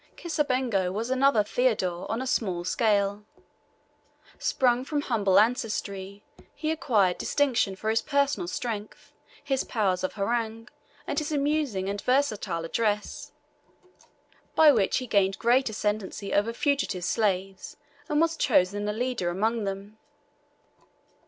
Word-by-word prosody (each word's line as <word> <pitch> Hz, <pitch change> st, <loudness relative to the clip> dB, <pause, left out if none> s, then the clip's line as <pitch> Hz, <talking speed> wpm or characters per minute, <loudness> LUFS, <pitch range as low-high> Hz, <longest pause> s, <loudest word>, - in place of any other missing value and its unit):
Kisabengo 255 Hz, -, 0 dB
was 225 Hz, +6 st, -3 dB
another 260 Hz, -4 st, +4 dB
Theodore 205 Hz, -7 st, 0 dB
on 230 Hz, +4 st, -1 dB
a -, -, -5 dB
small 185 Hz, -9 st, -1 dB
scale. 205 Hz, 0 st, +1 dB, 1.2 s
Sprung 250 Hz, -1 st, +2 dB
from 290 Hz, +1 st, -2 dB
humble 200 Hz, -8 st, +3 dB
ancestry, 205 Hz, -3 st, -1 dB, 0.3 s
he 310 Hz, 0 st, -2 dB
acquired 210 Hz, -, +1 dB
distinction 245 Hz, -9 st, +1 dB
for 215 Hz, -, -7 dB
his 225 Hz, 0 st, +2 dB
personal 280 Hz, -, 0 dB
strength, 210 Hz, +3 st, -5 dB, 0.3 s
his 270 Hz, -2 st, 0 dB
powers 190 Hz, -6 st, 0 dB
of 185 Hz, -, -2 dB
harangue, 225 Hz, +2 st, -2 dB, 0.4 s
and 285 Hz, -, -1 dB
his 305 Hz, 0 st, -4 dB
amusing 285 Hz, -9 st, 0 dB
and 200 Hz, 0 st, -3 dB
versatile 215 Hz, -11 st, 0 dB
address, 210 Hz, +3 st, -2 dB, 1.2 s
by 315 Hz, -2 st, +8 dB
which 210 Hz, -8 st, +2 dB
he 255 Hz, -, -3 dB
gained 195 Hz, -4 st, +2 dB
great 245 Hz, +2 st, +3 dB
ascendency 210 Hz, -1 st, -3 dB
over 205 Hz, +3 st, +2 dB
fugitive 235 Hz, -, -1 dB
slaves, 195 Hz, -2 st, -1 dB, 0.3 s
and 300 Hz, -1 st, +2 dB
was 330 Hz, 0 st, +2 dB
chosen 205 Hz, -, +2 dB
a -, -, -1 dB
leader 240 Hz, -5 st, -1 dB
among 215 Hz, +5 st, 0 dB
them. 200 Hz, +2 st, -6 dB
220 Hz, 125 wpm, -27 LUFS, 195-260 Hz, 1.2 s, by